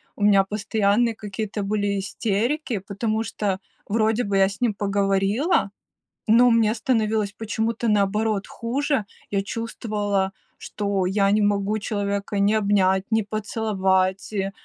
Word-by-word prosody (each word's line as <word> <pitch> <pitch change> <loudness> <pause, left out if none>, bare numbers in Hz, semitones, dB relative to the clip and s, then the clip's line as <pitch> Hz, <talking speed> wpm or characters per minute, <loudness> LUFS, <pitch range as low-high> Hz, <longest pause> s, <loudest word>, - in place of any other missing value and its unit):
у 205 - -4
меня 200 -2 +5
постоянные 210 +2 +1
какие-то 210 0 -5
были 200 0 -1
истерики, 225 +5 -1
потому 215 +3 -2
что 200 -3 -2 0.3
вроде 220 +2 +1
бы 200 -1 0
я 195 0 +5
с 200 +4 -10
ним 230 -4 +2
поговорила, 200 - +1 0.6
но 235 +3 +6
мне 225 -1 +3
становилось 220 -4 0
почему-то 225 +1 -2
наоборот 210 0 +1
хуже. 265 0 -1 0.3
Я 200 -1 0
чувствовала, 205 -3 -2 0.2
что 200 -2 -2
я 195 +1 +2
не 210 +1 +3
могу 205 +1 +1
человека 200 -1 -2
ни 200 +2 +3
обнять, 195 -2 +2
ни 220 0 +3
поцеловать, 195 -3 -1
и, 195 -1 -1
205 Hz, 130 wpm, -23 LUFS, 200-220 Hz, 0.6 s, но